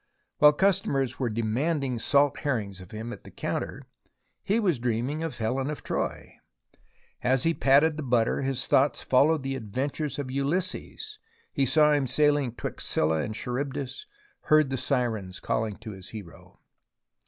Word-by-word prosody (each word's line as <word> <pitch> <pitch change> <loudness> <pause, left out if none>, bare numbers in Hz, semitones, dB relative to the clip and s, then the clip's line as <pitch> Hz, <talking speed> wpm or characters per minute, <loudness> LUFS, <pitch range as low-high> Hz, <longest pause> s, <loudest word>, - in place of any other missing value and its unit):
While 150 0 +8
customers 145 -8 +1
were 125 -3 0
demanding 125 +4 -1
salt 140 +3 +3
herrings 105 -10 -2
of 90 - -12
him 110 +3 -6
at - - -11
the - - -11
counter, - - -4 0.6
he 210 +4 +1
was 180 - +1
dreaming 120 +6 -1
of 165 -2 -4
Helen 130 +5 -1
of 150 - -5
Troy, - - -4 0.8
and 125 - +2
as 130 - +2
he 165 - +3
patted 150 +2 +4
the - - -3
butter 120 -2 +1
his 135 -1 -1
thoughts 140 +2 +3
followed 145 +3 +3
the 135 0 -2
adventures 135 +5 -3
of 135 -3 -4
Ulysses, 185 - -2 0.5
saw 150 +3 +5
him 140 -3 +1
sailing 145 -2 +2
'twixt - - -5
Scylla 80 0 +2
and 110 - -4
Charybdis, 135 - -4 0.4
heard 155 -3 +4
the 135 - -1
sirens 115 -8 -1
calling 110 -2 -2
to 110 0 -8
his 95 -2 -10
hero. 100 -7 -11
135 Hz, 155 wpm, -27 LUFS, 115-150 Hz, 0.8 s, While